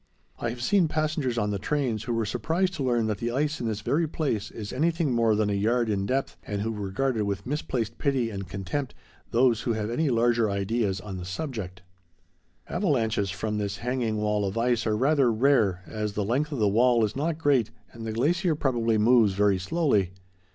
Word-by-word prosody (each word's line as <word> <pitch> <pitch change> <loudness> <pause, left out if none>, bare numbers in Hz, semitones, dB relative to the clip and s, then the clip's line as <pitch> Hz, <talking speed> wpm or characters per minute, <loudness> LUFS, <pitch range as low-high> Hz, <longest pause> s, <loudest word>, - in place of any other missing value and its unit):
I 120 - -1
have 120 +1 -5
seen 190 +2 +3
passengers 155 -5 -1
on 105 -2 0
the 100 - -2
trains 125 -5 -1
who 120 - -1
were 115 -1 0
surprised 160 - 0
to 155 -5 -3
learn 120 -3 +1
that 105 -2 -2
the 120 - -1
ice 145 +5 -1
in 120 - -1
this 110 -2 -2
very 160 +9 +1
place 140 -10 -2
is 105 -2 -7
anything 160 0 +1
more 115 -2 +3
than 105 -1 +1
a - - +1
yard 115 +4 +1
in 100 -1 -1
depth, 135 +1 -1
and 100 0 -3
who 115 - -1
regarded 110 +3 -1
with 100 -1 -3
misplaced 125 -5 -3
pity 130 -5 0
and 100 -3 -6
contempt 100 +9 -4 0.3
those 120 -2 +3
who 120 - 0
have 110 0 -2
any 150 +5 +1
larger 120 -2 +2
ideas 100 0 -1
on 100 -2 -6
the 90 - -6
subject. 95 - -5 0.8
Avalanches 115 - 0
from 105 +3 -3
this 100 -1 -3
hanging 120 -2 -1
wall 105 -1 0
of 100 +2 -2
ice 120 0 +1
are 105 -1 +1
rather 135 0 +3
rare, 110 -6 +2
as 105 -1 -4
the 105 -1 -1
length 140 +8 0
of 145 - -3
the 105 -3 +2
wall 115 +2 +4
is 105 - -5
not 155 +3 -1
great 140 -8 +2 0.2
and 115 - -10
the 110 - -3
glacier 160 - +1
probably 120 -6 +1
moves 110 -2 +4
very 100 -1 +2
slowly. 105 - +1
115 Hz, 205 wpm, -26 LUFS, 105-135 Hz, 0.8 s, wall